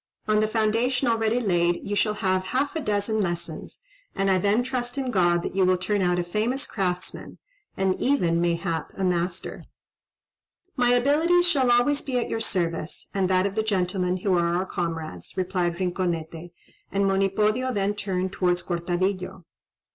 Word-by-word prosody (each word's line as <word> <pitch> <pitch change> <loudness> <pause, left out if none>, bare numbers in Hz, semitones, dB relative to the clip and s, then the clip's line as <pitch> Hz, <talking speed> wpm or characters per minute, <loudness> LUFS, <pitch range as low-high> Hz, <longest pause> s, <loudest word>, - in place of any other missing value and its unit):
On 215 0 +3
the 215 - +2
foundation 230 +4 +1
already 225 0 +2
laid 175 -5 +1
you 205 - -1
shall 210 +1 +1
have 185 -2 0
half 280 +4 0
a - - 0
dozen 210 -2 0
lessons; 175 - -4 0.3
and 195 0 +1
I 185 - +3
then 205 +5 +2
trust 250 0 -3
in 265 -2 -1
God 175 -4 +2
that - - -5
you 195 - +3
will 185 0 +3
turn 200 +2 -1
out 180 -1 +2
a 175 - 0
famous 220 +10 -1
craftsman, 180 -3 -4 0.4
and 190 -1 +2
even, 175 -12 +2
mayhap, 170 -2 -1
a 195 - -2
master." 180 0 -2 1.1
"My 245 -3 +2
abilities 305 +8 +3
shall 270 -7 +2
always 245 +4 +3
be 260 -3 -2
at 240 - -1
your 225 - -2
service, 170 -6 -3
and 190 -2 +1
that 185 0 +3
of 200 - -1
the 220 - +1
gentlemen 185 -3 0
who 185 0 +1
are 170 0 +1
our 185 +2 0
comrades," 165 - -5
replied 180 -2 0
Rinconete; 175 -2 -3 0.4
and 200 0 +1
Monipodio 210 +6 +1
then 200 -3 0
turned 190 -2 -2
towards 180 -2 0
Cortadillo. 180 +1 -2
195 Hz, 170 wpm, -25 LUFS, 180-225 Hz, 1.1 s, On